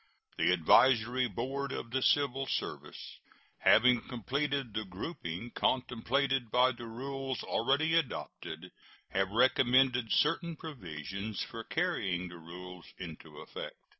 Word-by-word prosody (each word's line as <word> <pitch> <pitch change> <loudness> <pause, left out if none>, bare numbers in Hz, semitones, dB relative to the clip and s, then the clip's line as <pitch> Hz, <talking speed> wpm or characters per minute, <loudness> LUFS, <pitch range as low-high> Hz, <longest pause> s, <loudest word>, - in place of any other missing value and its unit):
The - - +3
Advisory 120 +8 +4
Board 135 +6 -3
of 115 - -5
the 130 +1 0
civil 135 -1 +2
service, - - -5 0.4
having 125 +1 +5
completed 135 +1 -2
the 110 0 -2
grouping 95 - -6
contemplated 130 0 0
by 125 +3 +4
the 120 -1 -8
rules 135 +2 -4
already 140 +7 +1
adopted, 165 -6 -2 0.4
have 95 0 0
recommended 125 +1 +3
certain 165 +2 +2
provisions 100 - -5
for 115 - -7
carrying 100 - -1
the 85 -1 -10
rules 90 +2 -10
into 80 -4 -9
effect. - - -7
125 Hz, 115 wpm, -32 LUFS, 100-135 Hz, 0.4 s, having